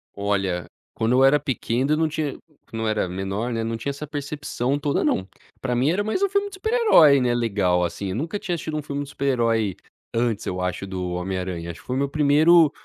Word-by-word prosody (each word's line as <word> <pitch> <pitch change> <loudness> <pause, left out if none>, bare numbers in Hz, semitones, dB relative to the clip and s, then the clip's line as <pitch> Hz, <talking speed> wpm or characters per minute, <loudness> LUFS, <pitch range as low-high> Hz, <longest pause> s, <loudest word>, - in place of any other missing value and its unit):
Olha, 100 -3 -1 0.3
quando 115 +2 0
eu 130 - +5
era 135 +2 +6
pequeno 135 -1 -1
eu - - +2
não 160 0 +2
tinha 155 -3 -3 0.3
quando 115 -2 -4
eu 110 - 0
era 105 -3 0
menor, 95 +6 -3
né, 115 0 -1
não 115 0 -2
tinha 115 - -4
essa 145 +2 -5
percepção 145 -2 -3
toda 145 0 0
não. 95 - 0 0.3
Pra 125 -2 -1
mim 130 +4 +2
era 190 +5 +1
mais 220 - -1
um 400 - +3
filme 400 +1 +1
de - - -18
super 440 +4 -2
herói, 170 - +6
né, 125 -1 +2
legal 100 -7 +1
assim, 95 +3 -3
eu 95 - -3
nunca 160 - -2
tinha 190 -4 -2
assistido 155 -1 -4
um 150 - -2
filme 140 0 -3
de 140 - -10
super 140 -1 -4
herói, 115 -7 +1 0.4
antes 115 -2 0
eu 90 0 -3
acho 90 +1 -2
do 90 -1 -4
Homem 95 +1 -2
Aranha. 90 -2 -4
Acho 85 - -12
que - - -25
foi 125 - -2
meu 140 +1 0
primeiro 150 +2 +5
125 Hz, 240 wpm, -23 LUFS, 100-150 Hz, 0.4 s, era